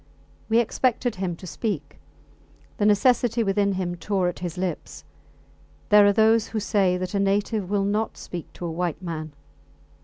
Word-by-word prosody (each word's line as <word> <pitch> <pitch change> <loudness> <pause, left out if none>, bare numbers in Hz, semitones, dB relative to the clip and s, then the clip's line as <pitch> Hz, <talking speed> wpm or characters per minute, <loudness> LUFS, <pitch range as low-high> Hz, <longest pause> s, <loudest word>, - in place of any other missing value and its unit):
We 225 - +3
expected 240 -1 +1
him 180 -2 -2
to 185 - -12
speak. 170 -6 -4 0.8
The 210 -3 +2
necessity 235 +2 +3
within 200 0 +1
him 185 -2 -2
tore 180 +1 -1
at 175 - -7
his 175 -1 -5
lips. 185 -1 -4 0.9
There 210 -1 +7
are - - +6
those 220 +1 +3
who 220 - -3
say 195 -3 +1
that 185 +1 -4
a 200 - +1
native 200 0 0
will 200 -1 +1
not 210 +2 -1
speak 175 -3 -8
to 175 - -7
a 170 - -3
white 175 +1 -3
man. 155 -3 -5
200 Hz, 165 wpm, -24 LUFS, 180-215 Hz, 0.9 s, There